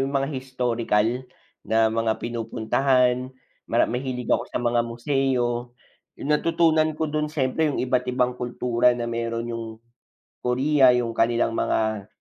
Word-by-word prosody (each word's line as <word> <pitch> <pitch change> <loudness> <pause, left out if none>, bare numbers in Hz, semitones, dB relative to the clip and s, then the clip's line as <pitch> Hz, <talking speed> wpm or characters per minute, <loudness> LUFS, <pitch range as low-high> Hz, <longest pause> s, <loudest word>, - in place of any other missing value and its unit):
'yong 140 - -7
mga 135 - -2
historical 120 -5 0 0.6
na 110 0 +3
mga 115 -1 +1
pinupuntahan, 125 +2 +1 0.4
mara - - +3
mahilig 125 0 -4
ako - - +2
sa - - -3
mga 120 0 +2
museo. 120 -1 -1 0.4
'Yong 140 - -6
natutunan 160 0 +2
ko 160 -1 -1
do'n 150 0 -1
syempre 150 +1 0
'yong 145 - -2
iba't 125 0 +1
ibang 125 0 +1
kultura 125 0 +1
na 120 - -3
meron 115 0 -3
'yong 115 -1 -4 0.8
Korea, 130 +1 +4
'yong 120 -1 0
kanilang 115 0 +2
mga 110 -2 0
125 Hz, 140 wpm, -24 LUFS, 115-135 Hz, 0.8 s, Korea